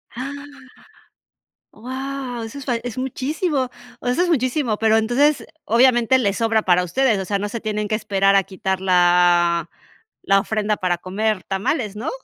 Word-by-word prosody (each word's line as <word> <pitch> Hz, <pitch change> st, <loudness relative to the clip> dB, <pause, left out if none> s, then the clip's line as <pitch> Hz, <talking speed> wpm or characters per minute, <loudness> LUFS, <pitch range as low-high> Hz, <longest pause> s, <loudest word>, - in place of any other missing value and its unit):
Ah. 265 Hz, +3 st, -5 dB, 1.4 s
Wao, 260 Hz, 0 st, -6 dB
eso 225 Hz, +5 st, -8 dB
es 275 Hz, -, -8 dB
fal 240 Hz, -3 st, -1 dB
es 245 Hz, 0 st, -6 dB
muchísimo, 265 Hz, +2 st, -2 dB, 0.3 s
o -, -, -7 dB
sea, 350 Hz, -, +1 dB
es 355 Hz, -, -1 dB
muchísimo, 255 Hz, -5 st, 0 dB
pero 220 Hz, 0 st, +3 dB
entonces 260 Hz, +7 st, +2 dB, 0.2 s
obviamente 240 Hz, +1 st, +4 dB
les 200 Hz, -5 st, 0 dB
sobra 225 Hz, -1 st, +1 dB
para 180 Hz, 0 st, +3 dB
ustedes, 220 Hz, +3 st, +1 dB
o 190 Hz, -, -4 dB
sea, 200 Hz, 0 st, -1 dB
no 205 Hz, -, -2 dB
se 230 Hz, 0 st, -5 dB
tienen 210 Hz, -1 st, -2 dB
que 215 Hz, -, -3 dB
esperar 195 Hz, -2 st, +2 dB
a 195 Hz, -, +5 dB
quitar 190 Hz, 0 st, -3 dB
la 175 Hz, -2 st, +3 dB, 0.5 s
la 195 Hz, 0 st, +4 dB
ofrenda 215 Hz, 0 st, -1 dB
para 180 Hz, -3 st, 0 dB
comer 205 Hz, +2 st, -2 dB
tamales, 205 Hz, +2 st, -2 dB
¿no? 235 Hz, +9 st, -4 dB
220 Hz, 165 wpm, -21 LUFS, 195-255 Hz, 1.4 s, a